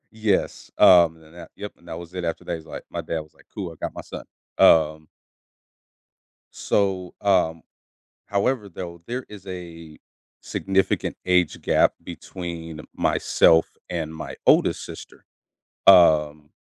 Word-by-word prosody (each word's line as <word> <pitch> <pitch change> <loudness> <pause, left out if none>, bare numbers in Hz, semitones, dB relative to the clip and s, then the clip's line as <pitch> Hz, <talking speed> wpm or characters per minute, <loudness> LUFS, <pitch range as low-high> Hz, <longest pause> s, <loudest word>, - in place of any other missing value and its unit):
Yes, 110 -3 -1
um, 85 -3 +6
then 80 0 -19
that 85 -1 -12
yep, 105 - -7
and 85 - -22
that 80 - -6
was 85 +1 -10
it 90 -1 -4
after 85 - -3
that, 85 - -3
he's 80 -1 -10
like - - -8
my - - -5
dad 80 - -3
was 75 - -17
like, - - -24
"Cool, 95 -5 -5
I - - -12
got - - -6
my - - -7
son," - - -9 0.3
um 80 -1 +4 1.5
so, 95 -3 -1
um 90 -5 +1 0.6
however, 105 +2 -1
though, 85 -1 -8
there 125 +2 -4
is 100 -2 -12
a 85 -4 -9 0.4
significant 95 0 -1
age 90 -3 +1
gap - - +3
between 85 -3 -8 0.2
myself 80 0 +3
and 80 -2 -4
my 80 - -7
oldest - - +3
sister, - - -12 0.6
um 75 -5 +5
85 Hz, 145 wpm, -23 LUFS, 80-95 Hz, 1.5 s, um